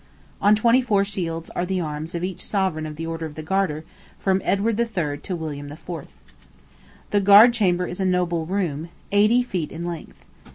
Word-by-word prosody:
On 205 +1 +6
twenty 235 +4 +4
four 205 -5 +2
shields 165 -5 -4
are - - -2
the 185 +1 -1
arms 155 0 -4
of 170 - -3
each 185 -1 -4
sovereign 185 -6 -1
of 150 - -7
the 165 +2 -5
Order 165 0 -4
of 150 - -12
the 155 - -6
Garter, 160 -3 -1 0.3
from 190 -1 +1
Edward 210 +3 +1
III. 175 -11 -1
to 185 +3 -4
William 145 -3 -6
IV. 155 +4 -13 1.2
The 205 - +3
Guard 205 +5 +8
Chamber 180 -6 +2
is 180 - -5
a 190 - +1
noble 175 -3 0
room, 170 -5 -2 0.2
eighty 215 +5 +4
feet 180 -10 -3
in 170 +2 -5
length. 170 -2 -7
180 Hz, 190 wpm, -23 LUFS, 160-200 Hz, 1.2 s, Guard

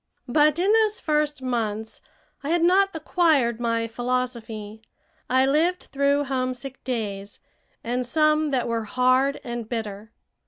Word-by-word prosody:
But 300 +4 +3
in 375 +4 +2
those 440 0 +3
first 300 - 0
months 220 -3 -3 0.4
I 285 - -3
had 340 0 +2
not 385 +3 +4
acquired 305 -8 +2
my 230 -1 0
philosophy. 230 -3 -4 0.5
I 260 +1 +4
lived 325 +7 +1
through 280 +1 +2
homesick 255 -1 -4
days, 205 -5 -4 0.4
and 245 +2 -1
some 305 +3 +2
that 260 -3 0
were 230 -1 -2
hard 255 +4 +2
and 235 -2 -5
bitter. 220 -2 -5
255 Hz, 130 wpm, -24 LUFS, 230-300 Hz, 0.5 s, not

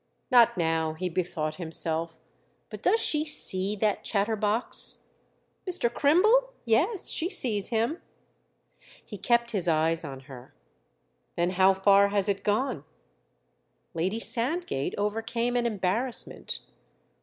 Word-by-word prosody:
"Not 240 -5 +5
now"—he 160 +1 -1
bethought 165 -3 -3
himself. 165 -1 -2 0.5
"But - - -8
does 450 - +2
she 305 -7 +2
see 200 -10 +2
that 210 0 -1
chatterbox?" 210 +2 -1 0.7
"Mr. 240 -10 +1
Crimble? 435 - +3
Yes, 320 - +2
she 340 - -1
sees 215 - +1
him." 235 +8 -1 1.0
He 205 - -9
kept 235 +3 +1
his 195 -6 -2
eyes 165 +1 +1
on 135 -3 -8
her. 130 - -13 0.8
"Then 175 +1 0
how 190 +1 +4
far 200 +1 +4
has 200 -1 -1
it 200 -1 -2
gone?" 210 - -1 1.1
Lady 185 +7 -2
Sandgate 230 - -1
overcame 225 +4 -2
an 240 -1 +1
embarrassment. 215 - -2
205 Hz, 115 wpm, -27 LUFS, 175-240 Hz, 1.1 s, Not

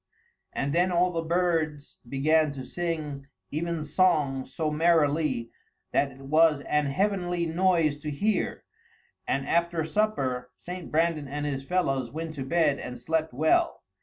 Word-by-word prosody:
And 140 +1 -2
then 180 +2 +3
all 180 +1 +3
the 165 -1 -1
birds 165 -3 -1
began 155 +3 +3
to 130 -2 -7
sing 155 -5 -4 0.3
evensong 155 -3 +1
so 155 +3 -2
merrilie 150 -6 +2 0.4
that 140 - +2
it 135 +1 -15
was 155 +1 +4
an 150 +1 0
heavenlie 175 +2 0
noise 165 -3 +2
to 150 +1 -6
hear; 205 +9 -1 0.6
and 135 0 -1
after 170 -1 +1
supper 140 -10 -1
St. 180 0 -7
Brandan 160 -2 +1
and 145 +2 -4
his 135 -2 -2
fellows 135 -7 0
went 160 +4 -5
to 140 -3 -4
bed 150 0 +2
and 125 0 -6
slept 160 +6 -1
well. 155 +6 +2
155 Hz, 140 wpm, -27 LUFS, 140-170 Hz, 0.6 s, was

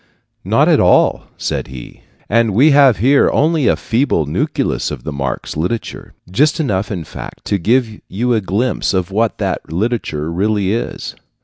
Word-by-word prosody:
"Not - - +2
at - - +4
all," - - +3
said - - -3
he; 65 -2 -11 0.3
"and 115 -2 +1
we 145 +7 +5
have 140 -5 +5
here 135 +8 +4
only 155 -2 +1
a - - +4
feeble 115 - 0
nucleus 75 - -1
of - - -7
the - - -5
Marx 70 -2 -4
literature 90 +9 -4 0.2
just 150 - +2
enough, 105 -10 -1
in 90 -5 -3
fact, 75 - -10
to 100 - 0
give 110 +3 0
you 120 +5 -1
a 110 - +1
glimpse 105 +3 -1
of 95 0 -1
what 110 +3 0
that - - -3
literature 85 -6 -2
really 100 +2 0
is. 115 - -4
105 Hz, 170 wpm, -16 LUFS, 90-125 Hz, 0.3 s, we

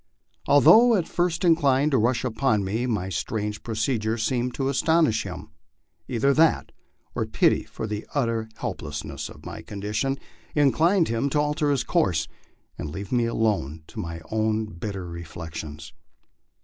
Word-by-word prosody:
Although 215 +12 +7
at 180 -5 0
first 175 0 0
inclined 145 -3 +3
to 130 - +3
rush 120 +3 +1
upon 120 -3 +1
me, 110 +6 -1
my 100 -6 -1
strange 105 +5 -3
procedure 110 -1 -1
seemed 120 +2 -1
to 135 - -1
astonish 140 -5 +2
him. 90 -4 -8 0.6
Either 130 +4 +2
that, 160 +2 +3 0.4
or - - -2
pity - - +2
for - - -6
the 105 0 -5
utter 115 -5 0
helplessness - - -5
of - - -14
my - - -7
condition, 105 +7 -2 0.4
inclined 160 +5 +3
him 115 +5 0
to 150 - +1
alter 150 0 +1
his 140 -3 +1
course 90 - +1 0.5
and 75 - -4
leave 95 +6 -7
me 120 -2 +2
alone 105 - -1
to - - -10
my 85 0 -5
own 110 0 +1
bitter 100 -1 -6
reflections. 80 -2 -8
115 Hz, 150 wpm, -25 LUFS, 100-140 Hz, 0.6 s, Although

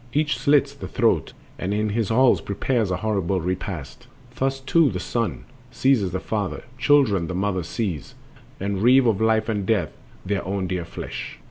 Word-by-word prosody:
Each 150 +1 +1
slits 140 -1 +3
the 140 - -8
throat 115 - +1 0.3
and 95 +3 -1
in 105 0 0
his 110 0 -1
halls 125 +2 +4
prepares 110 +1 -1
A 90 - 0
horrible 95 -3 0
repast. 90 -3 -5 0.3
Thus 135 0 -1
too 150 +3 +3
the 90 -5 -3
son 100 - -2 0.2
Seizes 125 -9 +2
the 95 - -2
father, 100 0 -3 0.2
children 120 - +3
the 90 - -4
mother 95 0 0
seize, 90 - -4 0.4
And 100 0 -2
reeve 125 +3 +6
of 110 -3 +2
life 110 -1 +2
and 105 -4 -2
eath 100 -9 +1 0.3
their 100 -1 -1
own 95 +1 -2
dear 90 -2 -3
flesh. - - -7
105 Hz, 170 wpm, -23 LUFS, 95-125 Hz, 0.4 s, reeve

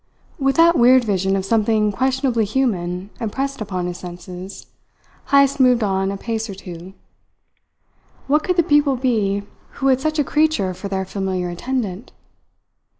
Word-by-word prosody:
With 270 -1 +1
that 335 +1 +5
weird 250 +1 +6
vision 195 -3 0
of 190 -1 -2
something 215 0 +2
questionably 260 0 0
human 195 -5 -1
impressed 270 +4 -3
upon 185 -4 -3
his 180 0 -5
senses, 180 +2 -9 0.6
Heyst 280 0 +4
moved 250 -3 +4
on 195 -1 0
a 200 - -3
pace 225 +1 -3
or 195 - -6
two. 180 -1 -10 1.3
What 300 +2 +2
could 360 - 0
the 340 - +5
people 290 -2 +3
be 215 -6 0 0.3
who 270 - 0
had 260 0 +3
such 310 +1 -1
a 295 - +3
creature 300 -11 +1
for 185 +3 -7
their 190 -1 -2
familiar 190 -2 -3
attendant? 210 +2 -4
215 Hz, 150 wpm, -20 LUFS, 190-265 Hz, 1.3 s, weird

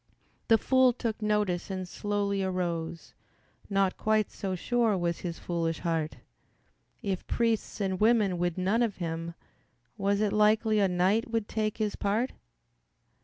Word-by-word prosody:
The 225 - +6
fool 260 +1 +4
took 230 -2 -3
notice 210 -5 0
and 185 -1 -4
slowly 200 +1 -1
arose, 170 -3 -3 0.6
Not 195 -2 +1
quite 215 -1 +1
so 190 -2 -3
sure 230 +1 +1
was 170 -1 -1
his 170 -2 -5
foolish 165 -2 -2
heart. 165 -2 -1 0.9
If 195 -3 -3
priests 230 -2 0
and 190 -2 -1
women 215 -5 +3
would 175 0 0
none 195 +6 +1
of 230 -4 0
him 165 -1 -4 0.6
Was 200 +1 +1
it 210 -1 +1
likely 215 +1 +3
a 200 - +4
knight 185 +6 +1
would 225 -2 -1
take 215 -1 -2
his 215 -2 -1
part? 215 +6 0
200 Hz, 145 wpm, -29 LUFS, 180-215 Hz, 0.9 s, The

